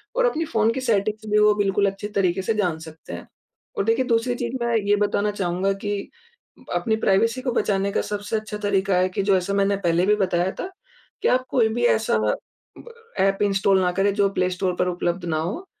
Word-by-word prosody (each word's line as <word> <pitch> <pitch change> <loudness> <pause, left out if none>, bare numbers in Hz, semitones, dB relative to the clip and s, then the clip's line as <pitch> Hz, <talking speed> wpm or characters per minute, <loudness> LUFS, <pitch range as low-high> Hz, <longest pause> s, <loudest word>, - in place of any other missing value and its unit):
और - - +3
अपनी 330 -9 0
फ़ोन 225 -4 +1
की 260 - -3
सेटिंग्स 215 -2 0
भी 210 - +4
वो 210 0 +5
बिल्कुल 200 0 +1
अच्छे 195 +1 -7
तरीके 190 -1 +1
से 205 +4 0
जान 180 -6 0
सकते 160 - -11
हैं। 85 - -8 0.5
और - - +1
देखिए 230 +3 +2
दूसरी 240 0 +1
चीज़ 240 +1 -4
मैं 235 -1 0
ये 205 -1 +2
बताना 205 0 0
चाहूँगा 190 0 -1
कि 205 -1 -3 0.7
अपनी 220 -2 +1
प्राइवेसी 230 +6 +2
को 255 -1 -1
बचाने 200 -2 0
का - - +1
सबसे 205 +1 -4
अच्छा 215 -1 -5
तरीका 195 -1 +1
है 185 +1 +2
कि 190 - -2
जो 190 - +5
ऐसा 185 +2 -2
मैंने 200 0 +2
पहले 170 +2 +2
भी 210 - +4
बताया 185 -2 0
था - - -6
फ़ोन - - -14 0.5
कि - - +3
आप 255 0 +2
कोई 230 -4 +3
भी 240 - -1
ऐसा 220 - 0
ब 105 0 +1 0.9
एप 195 0 +2
इंस्टॉल 195 -1 +3
ना 180 - +1
करे 200 +1 +3
जो 200 -1 +2
प्ले 180 0 +1
स्टोर 180 0 -1
पर 180 - +2
उपलब्ध 175 0 -2
ना 160 -2 -1
हो। 200 - -4
200 Hz, 220 wpm, -23 LUFS, 185-220 Hz, 0.9 s, वो